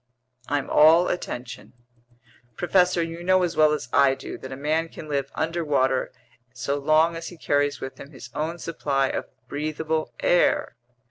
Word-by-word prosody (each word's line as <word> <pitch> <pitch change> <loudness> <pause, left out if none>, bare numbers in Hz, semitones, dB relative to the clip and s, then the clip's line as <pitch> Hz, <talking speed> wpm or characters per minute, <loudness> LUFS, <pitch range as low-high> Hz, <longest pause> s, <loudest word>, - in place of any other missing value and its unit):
"I'm 145 -1 -1
all 160 +4 +6
attention." 125 -9 -5 0.8
"Professor, 180 +1 +2
you 165 +1 -6
know 185 +1 +3
as 175 - -1
well 155 -1 +5
as 150 -5 -2
I 135 0 +5
do - - -8
that 130 - -9
a - - -4
man 155 +3 0
can 155 - -10
live 140 -2 -2
underwater 150 -6 0 0.4
so 140 +3 -2
long 155 +3 +3
as 165 0 -6
he 175 - -10
carries 145 -2 0
with 130 - -7
him 140 - -10
his 130 -4 -12
own 160 +3 -3
supply 140 -5 -1
of - - -4 0.2
breathable 155 +2 -2
air. 175 -8 +2
155 Hz, 160 wpm, -24 LUFS, 140-165 Hz, 0.8 s, all